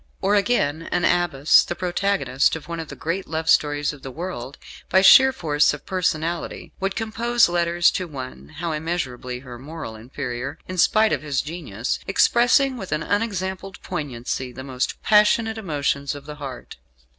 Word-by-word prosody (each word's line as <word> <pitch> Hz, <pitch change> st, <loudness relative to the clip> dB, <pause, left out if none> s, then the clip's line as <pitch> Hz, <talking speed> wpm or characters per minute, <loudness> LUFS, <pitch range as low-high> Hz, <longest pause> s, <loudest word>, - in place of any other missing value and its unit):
Or, 195 Hz, +1 st, +1 dB
again, 170 Hz, -8 st, +1 dB
an 175 Hz, -1 st, +1 dB
Abbess, 175 Hz, -5 st, +4 dB
the 175 Hz, -, -4 dB
protagonist 180 Hz, -8 st, +1 dB
of 155 Hz, -1 st, -8 dB
one 170 Hz, -1 st, -5 dB
of 160 Hz, -, -5 dB
the -, -, -9 dB
great 175 Hz, +4 st, -3 dB
love 160 Hz, 0 st, -3 dB
stories 145 Hz, -1 st, +2 dB
of 145 Hz, -, -13 dB
the 135 Hz, -, -7 dB
world, 140 Hz, -4 st, -6 dB, 0.3 s
by 190 Hz, +1 st, +4 dB
sheer 265 Hz, +5 st, +8 dB
force 150 Hz, -, +2 dB
of 150 Hz, -, -14 dB
personality, 170 Hz, -2 st, -2 dB
would 195 Hz, 0 st, -2 dB
compose 230 Hz, +2 st, +2 dB
letters 175 Hz, 0 st, +2 dB
to 185 Hz, -, -3 dB
one 135 Hz, +1 st, -9 dB
how 170 Hz, +1 st, -2 dB
immeasurably 135 Hz, -6 st, -3 dB
her 125 Hz, -3 st, -10 dB
moral 145 Hz, -4 st, -8 dB
inferior, 130 Hz, +4 st, -5 dB
in 185 Hz, -1 st, -4 dB
spite 215 Hz, +4 st, +4 dB
of -, -, -1 dB
his 145 Hz, -3 st, -1 dB
genius 145 Hz, -, -4 dB
expressing 250 Hz, +6 st, +3 dB
with 190 Hz, -5 st, -7 dB
an 155 Hz, 0 st, -1 dB
unexampled 195 Hz, -3 st, -2 dB
poignancy 130 Hz, -2 st, -4 dB
the 130 Hz, +1 st, -9 dB
most 130 Hz, -1 st, -3 dB
passionate 220 Hz, +1 st, +3 dB
emotions 140 Hz, -6 st, -1 dB
of 145 Hz, 0 st, -10 dB
the 150 Hz, 0 st, -8 dB
heart. 135 Hz, -4 st, -8 dB
160 Hz, 170 wpm, -23 LUFS, 140-190 Hz, 0.3 s, sheer